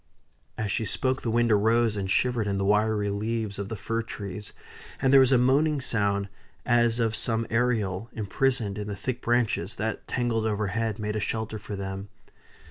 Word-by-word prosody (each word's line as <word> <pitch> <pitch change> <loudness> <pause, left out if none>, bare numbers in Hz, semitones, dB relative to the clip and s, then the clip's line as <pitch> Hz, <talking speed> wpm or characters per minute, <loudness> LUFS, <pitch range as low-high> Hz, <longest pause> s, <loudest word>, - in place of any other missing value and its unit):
As 110 -2 -2
she 110 - 0
spoke 130 +5 0
the 115 - -2
wind 120 +1 +2
arose 110 +1 +3
and 95 -2 -3
shivered 120 0 +1
in 100 -1 0
the 100 - 0
wiry 105 0 +2
leaves 105 0 -2
of 100 0 -4
the 110 - -3
fir 115 +3 -2
trees, 105 -2 -7 0.5
and 135 0 +2
there 135 - +9
was 130 -1 +5
a 130 - +6
moaning 140 +4 +3
sound 100 -5 0 0.4
as 120 -1 +3
of 115 -1 +1
some 115 0 0
Ariel 115 -3 0
imprisoned 110 -1 0
in 105 - -4
the 100 - -4
thick 125 +5 -4
branches 115 -3 +1
that, 110 +2 -3
tangled 115 -3 0
overhead, 105 +1 -1
made 105 0 -3
a - - 0
shelter 110 +1 -3
for 105 0 -6
them. 95 0 -5
110 Hz, 185 wpm, -27 LUFS, 100-120 Hz, 0.5 s, there